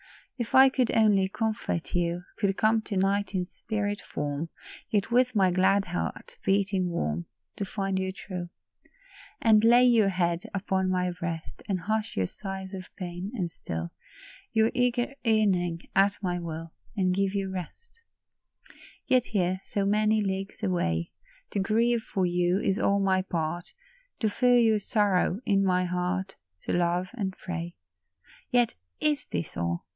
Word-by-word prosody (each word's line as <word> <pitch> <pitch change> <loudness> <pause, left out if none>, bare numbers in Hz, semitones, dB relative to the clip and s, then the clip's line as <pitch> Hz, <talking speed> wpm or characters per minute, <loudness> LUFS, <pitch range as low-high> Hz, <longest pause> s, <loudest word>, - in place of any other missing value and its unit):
If 240 -4 -3
I 265 0 +9
could 255 -2 +1
only 205 -4 +4
comfort 215 -5 -2
you, 175 0 0 0.2
Could 195 -1 +1
come 220 +1 +3
to 200 - -3
night 195 +1 +1
in 180 -1 0
spirit 205 +1 -3
form, 145 +2 -4 0.4
Yet 205 +2 0
with 250 0 +3
my 190 -3 +4
glad 195 +2 +3
heart 175 0 -4
beating 195 -2 +1
warm 85 - -2 0.3
To 200 - -2
find 195 -1 -2
you 190 0 -1
true; 185 -2 -6 0.9
And 220 -2 +5
lay 240 +2 +7
your 230 -5 +5
head 175 -2 0
upon 190 -1 0
my 180 -1 +1
breast, 170 -2 -5
And 185 -3 0
hush 215 +3 -2
your 95 - +2
sighs 190 - -6
of 185 -1 -7
pain, 180 +1 -5
and 180 -7 -2
still 80 - -5 0.6
Your 220 0 +3
eager 245 +1 +1
yearning, 190 -7 +1
at 195 +1 +4
my 175 -1 -1
will, 165 -1 -6 0.2
And 185 -2 +2
give 195 +1 0
you 195 -1 -1
rest. 190 - -8 1.1
42 - - +6
LOVE'S 250 -1 +4
SACRIFICE. - - -14
43 - - +4
Yet 180 - +3
here, 185 +1 -2
so 200 -1 -1
many 215 +1 +3
leagues 195 +2 -4
away, 85 - 0 0.4
To 205 - -1
grieve 230 +4 +2
for 190 -4 -1
you 175 +1 +2
is 195 0 0
all 200 -4 +2
my 190 -1 +2
part, 175 -1 -3 0.5
To 220 - +1
feel 245 +3 +4
your 225 -3 +4
sorrow 200 -2 +1
in 195 -1 +3
my 180 -1 +2
heart, 180 +2 -2 0.2
To - - -3
love 175 +1 +1
and 195 -6 -3
pray. 175 -1 -5 0.8
Yet 245 -2 +3 0.3
is 150 -1 +1
this 85 - -4
all 85 0 -2
190 Hz, 165 wpm, -28 LUFS, 175-215 Hz, 1.1 s, I